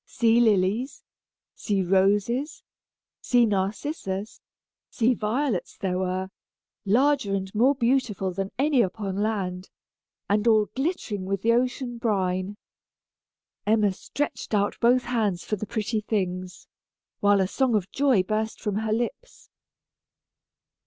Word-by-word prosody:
Sea 230 Hz, 0 st, +3 dB
lilies, 220 Hz, +3 st, +1 dB, 0.5 s
sea 200 Hz, -3 st, -1 dB
roses, 205 Hz, -, +1 dB, 0.6 s
sea 245 Hz, -1 st, +3 dB
narcissus, 200 Hz, +1 st, -3 dB, 0.5 s
sea 240 Hz, +1 st, +2 dB
violets 225 Hz, -1 st, -2 dB
there 185 Hz, -1 st, -2 dB
were, 185 Hz, 0 st, -2 dB, 0.6 s
larger 250 Hz, -1 st, +2 dB
and 190 Hz, 0 st, -4 dB
more 250 Hz, +6 st, +3 dB
beautiful 235 Hz, -7 st, 0 dB
than 195 Hz, +1 st, -3 dB
any 280 Hz, -1 st, +3 dB
upon 195 Hz, -1 st, -2 dB
land, 195 Hz, -3 st, -2 dB, 0.6 s
and 210 Hz, +3 st, +1 dB
all 215 Hz, -2 st, +5 dB
glittering 265 Hz, -, -2 dB
with 195 Hz, 0 st, -2 dB
the 230 Hz, +1 st, +4 dB
ocean 245 Hz, 0 st, -1 dB
brine. 190 Hz, -3 st, -1 dB, 1.1 s
Emma 210 Hz, -2 st, +3 dB
stretched 285 Hz, +1 st, -4 dB
out 205 Hz, 0 st, +1 dB
both 245 Hz, +1 st, +4 dB
hands 215 Hz, -7 st, -1 dB
for 210 Hz, -, -1 dB
the 210 Hz, +1 st, -6 dB
pretty 220 Hz, +1 st, -2 dB
things, 185 Hz, -4 st, -3 dB, 0.5 s
while 205 Hz, 0 st, +4 dB
a 190 Hz, -, +2 dB
song 250 Hz, +3 st, +1 dB
of 200 Hz, -2 st, -1 dB
joy 265 Hz, -9 st, +3 dB
burst 215 Hz, +3 st, -2 dB
from 210 Hz, -2 st, -2 dB
her 220 Hz, 0 st, -2 dB
lips. 240 Hz, -, -4 dB
215 Hz, 125 wpm, -25 LUFS, 195-240 Hz, 1.1 s, all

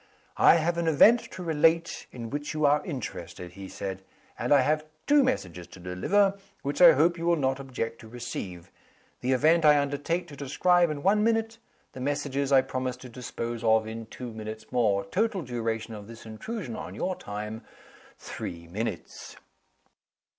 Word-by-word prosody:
"I -, -, +7 dB
have 170 Hz, +1 st, +1 dB
an 170 Hz, -, -1 dB
event 210 Hz, +10 st, +6 dB
to 185 Hz, -, -6 dB
relate 165 Hz, +1 st, +1 dB
in 115 Hz, -2 st, -7 dB
which 145 Hz, +2 st, -4 dB
you 155 Hz, -1 st, +2 dB
are 145 Hz, +1 st, +4 dB
interested," 90 Hz, -, -6 dB
he 95 Hz, +1 st, -9 dB
said. 95 Hz, -1 st, -5 dB, 0.4 s
"And -, -, -2 dB
I 145 Hz, -2 st, +7 dB
have 155 Hz, +3 st, +1 dB, 0.2 s
two 290 Hz, -1 st, +5 dB
messages 90 Hz, -, -2 dB
to -, -, -14 dB
deliver, 195 Hz, -, +1 dB, 0.2 s
which 140 Hz, +4 st, -2 dB
I 175 Hz, -2 st, +10 dB
hope 170 Hz, +4 st, +2 dB
you 170 Hz, -, -2 dB
will 170 Hz, -, +4 dB
not 135 Hz, -3 st, 0 dB
object 125 Hz, -4 st, -4 dB
to 110 Hz, -, -12 dB
receive. 110 Hz, -7 st, -7 dB, 0.5 s
The 130 Hz, +1 st, +1 dB
event 160 Hz, +6 st, +4 dB
I 150 Hz, -1 st, +7 dB
undertake 145 Hz, +5 st, -1 dB
to 145 Hz, -, -10 dB
describe 175 Hz, +5 st, +2 dB
in 145 Hz, -2 st, -4 dB
one 210 Hz, +3 st, +4 dB
minute. 225 Hz, 0 st, 0 dB, 0.3 s
The -, -, -9 dB
messages 140 Hz, 0 st, -1 dB
I 135 Hz, -1 st, +7 dB
promise 130 Hz, -1 st, -3 dB
to 125 Hz, 0 st, -11 dB
dispose 120 Hz, -1 st, -5 dB
of 110 Hz, -1 st, +4 dB
in 110 Hz, 0 st, -7 dB
two 125 Hz, +1 st, -8 dB
minutes 110 Hz, 0 st, -8 dB
more. 105 Hz, -5 st, +2 dB
Total 195 Hz, -, 0 dB
duration 115 Hz, -3 st, -3 dB
of 105 Hz, -2 st, -9 dB
this 115 Hz, -1 st, -12 dB
intrusion 125 Hz, -, -6 dB
on 90 Hz, +3 st, -7 dB
your 185 Hz, -, -2 dB
time 105 Hz, -1 st, -6 dB, 0.5 s
three 85 Hz, -1 st, -7 dB
minutes." 105 Hz, -1 st, -5 dB
130 Hz, 175 wpm, -27 LUFS, 110-165 Hz, 0.5 s, I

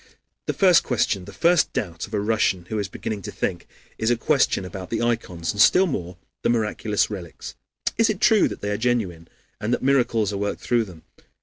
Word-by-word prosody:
The -, -, 0 dB
first 185 Hz, -4 st, +5 dB
question, 100 Hz, -6 st, 0 dB
the -, -, -10 dB
first 170 Hz, -1 st, +2 dB
doubt 85 Hz, -5 st, -3 dB
of 105 Hz, -, -17 dB
a -, -, +1 dB
Russian 100 Hz, -4 st, +1 dB
who 110 Hz, -, -2 dB
is 100 Hz, -, -2 dB
beginning 105 Hz, +2 st, -5 dB
to -, -, -6 dB
think, 85 Hz, -2 st, -3 dB, 0.3 s
is 110 Hz, -, +1 dB
a 120 Hz, -, +2 dB
question 95 Hz, -, +1 dB
about 95 Hz, 0 st, -7 dB
the 115 Hz, -, -1 dB
ikons, 110 Hz, -8 st, -1 dB
and 100 Hz, -, 0 dB
still 185 Hz, -, +6 dB
more 90 Hz, -, -4 dB, 0.2 s
the -, -, +1 dB
miraculous 110 Hz, -2 st, 0 dB
relics: 90 Hz, -5 st, -7 dB, 0.5 s
Is 230 Hz, -, +4 dB
it 205 Hz, -4 st, -1 dB
true 220 Hz, -3 st, +5 dB
that -, -, -7 dB
they 105 Hz, -, -2 dB
are 105 Hz, -, -1 dB
genuine, 105 Hz, -9 st, -1 dB, 0.3 s
and 105 Hz, -, -2 dB
that 125 Hz, -, 0 dB
miracles 120 Hz, -6 st, +2 dB
are -, -, -2 dB
worked 100 Hz, 0 st, -3 dB
through 120 Hz, -2 st, +1 dB
them? 85 Hz, -5 st, -13 dB
105 Hz, 210 wpm, -23 LUFS, 95-120 Hz, 0.5 s, still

